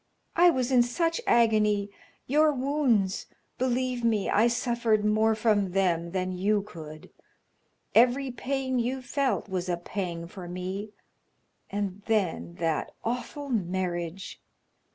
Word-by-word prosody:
I 350 +1 +7
was 260 -5 0
in 250 -2 +6
such 330 - 0
agony 210 -3 +3 0.3
your 300 +3 +4
wounds 255 -8 +1 0.3
believe 255 -1 0
me, 220 -4 +1
I 220 +3 +4
suffered 235 -3 +1
more 220 +1 +3
from 210 -4 +1
them 175 -3 +1
than 185 +1 -2
you 200 +3 +1
could. 155 -5 -10 0.8
Every 250 +3 +4
pain 260 +1 -2
you 255 +2 -2
felt 255 - -1
was 185 -2 -3
a 175 - 0
pang 175 -1 -4
for 180 +1 -9
me 185 +4 -5 0.8
and 205 -1 -3
then 170 - 0
that 160 - -2
awful 250 +4 -4
marriage! 180 -4 -3
215 Hz, 125 wpm, -28 LUFS, 185-250 Hz, 0.8 s, I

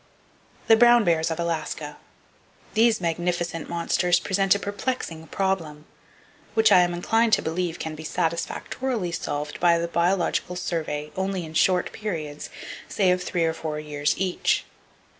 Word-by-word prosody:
The 225 - +7
Brown 240 0 +6
Bears 165 -3 +2
Of 160 +1 -3
Alaska. 155 -3 -3 0.8
—These 225 -2 +3
magnificent 175 0 -2
monsters 175 +1 +1
present 195 +1 +2
a - - -1
perplexing 200 -6 -4
problem, 165 -5 -2 0.7
which 220 0 +5
I - - +8
am 175 0 +1
inclined 225 +5 +2
to - - +4
believe 170 +1 -2
can 160 - -5
be 155 0 -9
satisfactorily 175 +6 -2
solved 150 -3 -4
by 170 -1 +4
the 170 0 -1
Biological 175 +1 0
Survey 155 -4 -3
only 190 -2 -2
in 160 - -10
short 180 +2 +2
periods, 160 -9 -5 0.4
say 190 -3 +2
of 180 0 +1
three 175 -2 0
or 160 - +1
four 155 -2 -4
years 150 -1 -1
each. 185 -2 0
175 Hz, 145 wpm, -25 LUFS, 160-190 Hz, 0.8 s, I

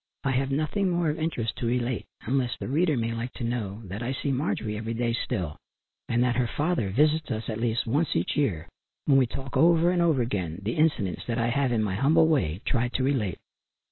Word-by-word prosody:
I 135 - +1
have 135 +1 0
nothing 155 +8 0
more 170 -3 +1
of 150 - -5
interest 120 -9 -2
to 120 - -2
relate, 120 0 -1 0.2
unless 125 0 0
the - - -5
reader 155 +2 +2
may 115 0 -1
like 120 +2 -4
to - - -6
know 115 -3 -3
that 100 +4 -6
I 125 +2 -2
see 140 +1 -2
Marjorie 125 -6 -1
every 115 +2 -4
day 115 0 0
still, 95 - -2 0.5
and 120 +1 +2
that 125 -1 +1
her 125 -1 +2
father 150 - 0
visits 150 +8 +2
us 110 0 -3
at 110 -1 -3
least 115 0 0
once 145 +7 0
each 85 - 0
year, 90 - 0 0.4
when 135 -2 +5
we 130 - +3
talk 135 +3 -6
over 170 +1 +5
and 180 -1 +1
over 160 -7 +3
again, 90 -8 -3
the 110 +4 -1
incidents 145 - +1
that 115 -1 -1
I 115 0 +1
have, 135 +1 +1
in 110 -2 +1
my 100 -3 -1
humble 155 - +4
way, 105 - +1
tried 120 -1 0
to 130 - 0
relate. 125 -10 0
125 Hz, 225 wpm, -27 LUFS, 115-145 Hz, 0.5 s, when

